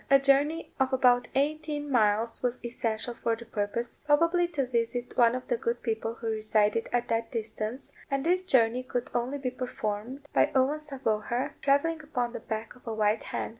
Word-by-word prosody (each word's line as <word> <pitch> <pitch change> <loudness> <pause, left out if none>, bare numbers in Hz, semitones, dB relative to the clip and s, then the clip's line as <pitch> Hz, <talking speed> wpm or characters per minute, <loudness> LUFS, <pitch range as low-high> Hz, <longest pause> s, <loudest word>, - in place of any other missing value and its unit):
A 275 - +8
journey 280 +4 +2
of 265 0 +2
about 245 -1 +4
eighteen 295 +1 -1
miles 225 -1 +2
was 245 -1 -2
essential 235 0 -2
for 230 -1 -1
the 235 +1 -11
purpose, 225 +2 -3
probably 335 +4 +3
to 300 -6 -1
visit 245 0 -2
one 235 0 +5
of 255 - -5
the 485 - +1
good 470 +1 -2
people 225 -1 -2
who 235 - -10
resided 215 0 +1
at 245 0 0
that 230 0 0
distance; 220 +2 -4 0.2
and 275 +1 -1
this 360 +2 +3
journey 250 -8 +3
could 250 -1 -4
only 245 +4 -1
be 260 -2 -2
performed 250 0 -4
by - - +4
Owen 270 +3 +3
sa 300 -3 -7
vauher 240 +3 -1
travelling 310 +4 +2
upon 250 -6 -2
the - - -4
back 220 0 -5
of 250 - -20
a 225 - -2
white 215 0 +2
hen. - - -3
245 Hz, 190 wpm, -29 LUFS, 225-280 Hz, 0.2 s, A